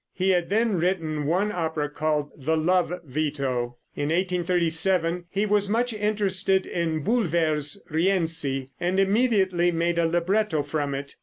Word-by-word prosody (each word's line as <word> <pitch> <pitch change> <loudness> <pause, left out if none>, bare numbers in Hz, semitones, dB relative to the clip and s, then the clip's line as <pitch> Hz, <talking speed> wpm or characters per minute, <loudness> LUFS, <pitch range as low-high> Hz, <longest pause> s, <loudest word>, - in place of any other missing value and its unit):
He 190 0 +2
had 175 -2 +1
then 215 -2 +1
written 160 -4 -1
one 190 +6 +1
opera, 160 -5 -2
called 150 0 -2
"The 155 +3 -1
Love 175 +2 +2
Veto." 135 -4 -2 0.2
In 145 - -2
1837 175 0 +1
he 200 +2 0
was 205 -1 +1
much 235 +2 0
interested 200 -3 +1
in 160 -3 -2
Bulwer's 170 - +1
"Rienzi," 160 -6 0
and 180 +2 0
immediately 195 -4 +2
made 170 0 0
a 165 - +3
libretto 175 -1 +1
from 145 -1 -2
it. 140 +1 -7
170 Hz, 140 wpm, -25 LUFS, 155-190 Hz, 0.2 s, a